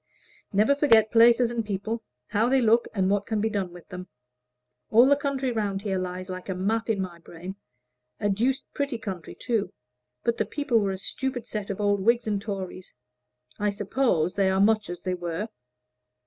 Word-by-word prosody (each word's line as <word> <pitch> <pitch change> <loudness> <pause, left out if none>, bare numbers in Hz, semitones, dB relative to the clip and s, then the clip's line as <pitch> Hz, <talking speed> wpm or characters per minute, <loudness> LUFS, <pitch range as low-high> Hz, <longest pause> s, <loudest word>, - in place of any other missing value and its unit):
"Never 215 +6 +4
forget 230 -7 +4
places 235 +1 +6
and 235 -1 -1
people 215 +2 -3 0.3
how 225 +4 +2
they 265 +1 +4
look 230 0 +4
and 190 -3 +1
what 200 +1 +1
can 220 -2 0
be 220 +1 0
done 195 -4 -2
with 175 -1 -13
them. 180 -1 -7 0.8
All 235 +3 +7
the 285 - +6
country 275 -2 -1
round 205 -4 -2
here 195 -3 -1
lies 185 0 -4
like 185 0 -7
a 190 - -1
map 220 +5 -1
in 215 -3 +1
my 180 -3 -4
brain. 175 +3 -9 0.6
A 205 - 0
deuced 235 +7 +1
pretty 280 -3 -2
country 190 -6 -6
too; 215 -6 -1 0.5
but 235 - +1
the - - +1
people 285 -6 +1
were 200 -2 0
a 190 - -2
stupid 250 +5 -3
set 210 -2 -5
of 200 - -4
old 205 -1 +2
Whigs 235 +4 +2
and 205 -2 -1
Tories. 190 - -6 0.6
I 210 0 +2
suppose 200 -4 +1
they 195 -1 +2
are 190 0 +1
much 215 0 +3
as 175 0 -6
they 185 - -1
were." 175 +4 -3
205 Hz, 190 wpm, -26 LUFS, 190-230 Hz, 0.8 s, All